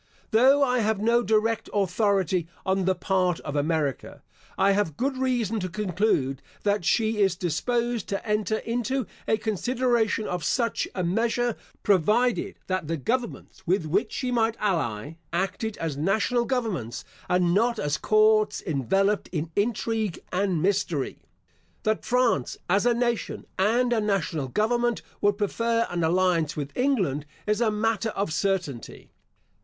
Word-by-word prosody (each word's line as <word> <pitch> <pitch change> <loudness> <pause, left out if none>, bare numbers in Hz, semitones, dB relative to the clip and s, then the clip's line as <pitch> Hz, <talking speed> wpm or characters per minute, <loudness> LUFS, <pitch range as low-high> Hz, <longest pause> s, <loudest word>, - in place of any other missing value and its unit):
Though 265 +5 +5
I 250 -2 +2
have 220 -2 +1
no 235 +3 +3
direct 220 0 +1
authority 190 -3 +1 0.2
on 190 0 +1
the 190 0 +2
part 180 -2 0
of 145 - -5
America, 145 -2 -1 0.3
I 195 +1 +4
have 195 -7 0
good 270 +1 0
reason 245 -5 0
to 185 -1 -3
conclude, 180 -8 0 0.2
that 205 -2 +1
she 220 +4 +1
is 195 -2 +3
disposed 235 +7 -1
to 200 +2 -3
enter 210 0 +1
into 245 +3 -2 0.2
a 220 - +3
consideration 225 +1 0
of 180 -2 -3
such 235 - 0
a 185 - -1
measure, 230 +6 0 0.3
provided, 210 +6 +2
that 185 -4 -2
the 165 +1 -1
governments 235 - -3
with 180 -1 +1
which 195 +8 0
she 255 -2 -2
might 230 -1 +1
ally, 160 - -1
acted 195 +4 -2
as 160 -4 -3
national 220 - +1
governments, 215 - -2 0.2
and 180 -1 +3
not 230 +4 +2
as 145 -6 -1
courts 215 0 +3
enveloped 195 - +1
in 160 -1 -3
intrigue 220 -2 -1
and 185 -3 0
mystery. 180 -7 0 0.6
That 215 0 0
France 245 - +1
as 200 +6 +2
a 240 - +3
nation, 235 -1 -1
and 240 +5 +3
a 225 - +1
national 180 -9 -1
government, 240 - 0 0.2
would 205 0 +2
prefer 230 +2 0
an 175 -1 -1
alliance 165 -2 +2
with 140 -1 -5
England, 190 - 0 0.2
is 210 +2 0
a 230 - +3
matter 220 0 0
of 200 -6 -2
certainty. 180 - -2
205 Hz, 145 wpm, -26 LUFS, 175-230 Hz, 0.6 s, Though